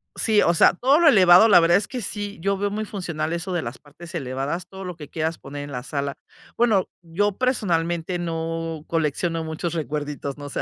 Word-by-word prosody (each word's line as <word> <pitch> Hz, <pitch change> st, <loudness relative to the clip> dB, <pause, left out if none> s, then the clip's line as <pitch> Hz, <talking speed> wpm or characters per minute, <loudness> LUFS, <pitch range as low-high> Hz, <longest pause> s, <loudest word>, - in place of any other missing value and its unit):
sí, 215 Hz, -2 st, +3 dB
o 170 Hz, -, +3 dB
sea, -, -, +5 dB
todo 270 Hz, -, +3 dB
lo 335 Hz, -, +5 dB
elevado, 185 Hz, -3 st, +7 dB
la 200 Hz, -, +7 dB
verdad 170 Hz, +2 st, +4 dB
es 205 Hz, -, -2 dB
que 255 Hz, -3 st, -5 dB
sí, 205 Hz, -1 st, -4 dB
yo 195 Hz, +1 st, 0 dB
veo 205 Hz, +1 st, -1 dB
muy 215 Hz, +1 st, -3 dB
funcional 170 Hz, -6 st, -4 dB
eso 175 Hz, +2 st, -3 dB
de 175 Hz, -, 0 dB
las 120 Hz, +1 st, -6 dB
partes 170 Hz, +4 st, -13 dB
elevadas, 140 Hz, +5 st, -3 dB
todo 190 Hz, 0 st, -9 dB
lo 180 Hz, -2 st, -6 dB
que 150 Hz, -3 st, -11 dB
quieras 160 Hz, 0 st, -2 dB
poner 145 Hz, +1 st, -8 dB
en 145 Hz, -, -8 dB
la 125 Hz, -1 st, -5 dB
sala. 140 Hz, -1 st, -3 dB, 0.4 s
Bueno, 220 Hz, -6 st, +2 dB
yo 190 Hz, +4 st, -1 dB
personalmente, 175 Hz, -8 st, 0 dB
no 165 Hz, -1 st, -4 dB
colecciono 165 Hz, +1 st, -1 dB
muchos 160 Hz, +1 st, -4 dB
recuerditos, 145 Hz, -2 st, -4 dB
no 145 Hz, 0 st, -8 dB
sé, -, -, -3 dB
170 Hz, 210 wpm, -23 LUFS, 155-195 Hz, 0.4 s, elevado